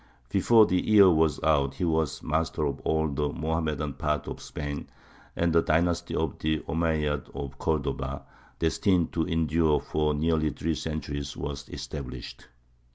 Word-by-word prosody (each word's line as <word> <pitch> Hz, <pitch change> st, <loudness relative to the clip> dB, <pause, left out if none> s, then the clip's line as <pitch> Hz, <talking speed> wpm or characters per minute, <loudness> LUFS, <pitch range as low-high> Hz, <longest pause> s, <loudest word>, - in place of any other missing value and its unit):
Before 110 Hz, +3 st, +5 dB
the 90 Hz, -2 st, +1 dB
year 100 Hz, -3 st, +7 dB
was 80 Hz, -2 st, +2 dB
out 70 Hz, -3 st, +2 dB
he 80 Hz, -, -3 dB
was 80 Hz, -5 st, 0 dB
master 80 Hz, 0 st, 0 dB
of 70 Hz, -1 st, -2 dB
all 80 Hz, 0 st, +1 dB
the 75 Hz, 0 st, -1 dB
Mohammedan 80 Hz, -2 st, -2 dB
part 75 Hz, +1 st, -2 dB
of -, -, -6 dB
Spain, 75 Hz, -1 st, -5 dB, 0.5 s
and 85 Hz, -1 st, +1 dB
the 85 Hz, -, +5 dB
dynasty 85 Hz, +2 st, +1 dB
of 80 Hz, -4 st, -2 dB
the 80 Hz, 0 st, 0 dB
Omeyyads 80 Hz, -3 st, 0 dB
of 70 Hz, -1 st, -6 dB
Cordova, 70 Hz, -3 st, -2 dB, 0.3 s
destined 85 Hz, +1 st, +1 dB
to 80 Hz, 0 st, 0 dB
endure 80 Hz, -2 st, +2 dB
for 75 Hz, -1 st, 0 dB
nearly 80 Hz, 0 st, +1 dB
three 80 Hz, +2 st, -2 dB
centuries, 70 Hz, -2 st, -4 dB
was 70 Hz, -2 st, -5 dB
established. 65 Hz, -4 st, -7 dB
80 Hz, 150 wpm, -27 LUFS, 75-80 Hz, 0.5 s, year